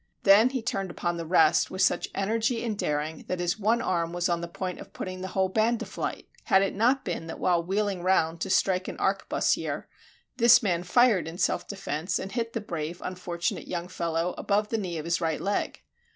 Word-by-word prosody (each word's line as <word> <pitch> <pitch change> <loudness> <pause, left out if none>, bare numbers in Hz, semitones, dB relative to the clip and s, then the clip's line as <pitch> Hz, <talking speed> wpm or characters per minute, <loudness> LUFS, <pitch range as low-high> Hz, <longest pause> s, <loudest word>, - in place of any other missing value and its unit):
Then 210 +5 +7
he 255 -3 -3
turned 195 -6 -2
upon 175 0 -2
the 165 -1 -5
rest 160 -2 +4
with 185 - 0
such - - +1
energy 225 +4 0
and 220 -2 -1
daring 150 -3 -2
that 185 - -2
his 175 +3 -1
one 225 +3 +2
arm 170 -2 -1
was 175 +1 0
on 170 -1 0
the 170 - -4
point 180 +1 -5
of - - -12
putting 185 0 -6
the 190 - -4
whole 190 0 +1
band 220 +4 +1
to - - -4
flight, - - -5 0.2
had 190 0 +4
it 195 - -1
not 250 +6 +2
been 170 -3 -4
that 165 - -6
while 175 -2 +2
wheeling 195 +1 -1
round 170 -3 +1
to 195 - -2
strike 185 -1 +2
an - - -6
arquebusier, 195 0 0 0.5
this 240 0 +7
man 175 -4 +1
fired 205 0 +3
in 165 +2 -7
self - - 0
defense 180 -3 -3
and 195 - -5
hit 230 +1 -2
the 230 - -2
brave 170 -3 -5
unfortunate 175 -2 -3
young 175 0 -4
fellow 170 -1 -2
above 210 +1 +1
the 225 - -1
knee 180 -4 -4
of 155 - -5
his 170 +1 0
right 160 -2 0
leg. 200 +1 -2
185 Hz, 215 wpm, -27 LUFS, 170-210 Hz, 0.5 s, Then